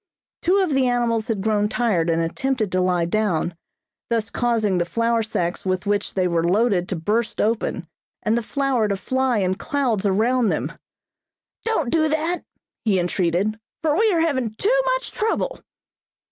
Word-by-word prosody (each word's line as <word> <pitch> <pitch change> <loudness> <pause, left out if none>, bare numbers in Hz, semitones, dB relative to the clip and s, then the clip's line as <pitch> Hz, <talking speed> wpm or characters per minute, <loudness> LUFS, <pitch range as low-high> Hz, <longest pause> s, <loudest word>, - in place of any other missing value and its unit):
Two 365 +3 +3
of 355 - -1
the 265 -1 +3
animals 235 -2 +1
had 220 -4 -1
grown 210 -1 +1
tired 205 -9 +1
and 165 0 +2
attempted 225 +4 -1
to 185 - +1
lie 180 -2 +2
down, 175 -3 0 0.5
thus 225 -2 0
causing 220 -6 +1
the 175 - +1
flour 230 +4 +1
sacks 175 -5 -2
with 185 +1 -1
which 205 0 -1
they 185 -2 +2
were 170 -1 +1
loaded 190 0 +2
to 190 - -1
burst 210 +8 -1
open 210 -5 0 0.4
and 220 - +2
the 235 - +1
flour 260 -2 0
to 200 -1 -1
fly 260 +3 0
in 185 -2 +1
clouds 225 -2 0
around 225 +4 +2
them. - - -1 0.9
"Don't 330 - 0
do 315 -1 +3
that," 320 +3 0 0.4
he 200 -5 +2
entreated, 180 +4 0 0.2
"for 305 -2 +2
we 435 +4 +3
are 335 -3 +2
having 260 -9 0
too 420 - +1 0.2
much - - -5
trouble!" 450 +3 -1
220 Hz, 170 wpm, -22 LUFS, 185-260 Hz, 0.9 s, Two